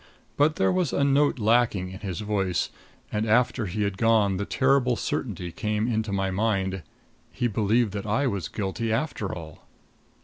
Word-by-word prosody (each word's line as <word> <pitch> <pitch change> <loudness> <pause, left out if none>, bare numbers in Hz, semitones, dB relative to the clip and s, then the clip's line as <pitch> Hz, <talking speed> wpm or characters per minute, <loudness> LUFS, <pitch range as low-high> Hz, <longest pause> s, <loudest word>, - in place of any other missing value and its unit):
But 150 +2 +3
there - - +2
was 185 -6 0
a 140 - +2
note 140 +1 +3
lacking 110 -5 +2
in 95 - -8
his 95 -4 -4
voice, 100 -4 -1 0.4
and 105 +1 -1
after 120 -1 +2
he 105 +4 -2
was 100 - +1
gone 105 -2 +2
the 100 - -2
terrible 130 -2 +2
certainty 95 -7 -3
came 105 +3 -1
into 110 -3 -1
my 95 -1 0
mind 95 -2 0 0.5
he - - -2
believed 110 +1 +1
that 100 0 -4
I 110 +7 +1
was 100 - -1
guilty 110 +3 -3
after 115 -5 -1
all. 80 -3 -9
105 Hz, 170 wpm, -26 LUFS, 95-120 Hz, 0.5 s, But